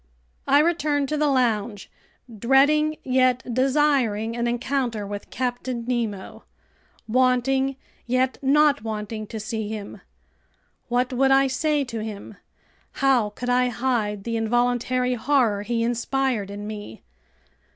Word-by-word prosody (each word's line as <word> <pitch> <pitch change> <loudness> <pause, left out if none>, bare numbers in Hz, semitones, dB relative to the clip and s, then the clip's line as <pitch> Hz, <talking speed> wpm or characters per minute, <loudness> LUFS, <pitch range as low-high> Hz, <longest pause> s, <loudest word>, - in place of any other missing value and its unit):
I 280 - +5
returned 300 -4 0
to 305 - -1
the 300 0 +2
lounge, 230 -6 0 0.5
dreading 300 +6 +3
yet 255 -1 +2
desiring 255 -5 +1
an 240 0 -1
encounter 240 -3 -1
with 205 0 -7
Captain 245 -1 -3
Nemo, 230 -6 -3 0.6
wanting 260 +3 +2 0.3
yet 255 +1 0
not 290 -1 +3
wanting 215 0 -5
to 220 - -6
see 220 0 -4
him. 215 -2 -7 0.9
What 250 +1 0
would 270 +2 +3
I 270 0 +5
say 290 +3 0
to 230 -4 -5
him? 210 -1 -8 0.6
How 260 -6 +2
could 245 +4 -4
I 250 0 +3
hide 220 -5 -1
the 230 +1 -2
involuntary 245 +2 +1
horror 245 -4 +1
he 230 +2 -1
inspired 240 -2 -1
in 205 +1 -7
me? 205 - -8
245 Hz, 125 wpm, -24 LUFS, 220-270 Hz, 0.9 s, I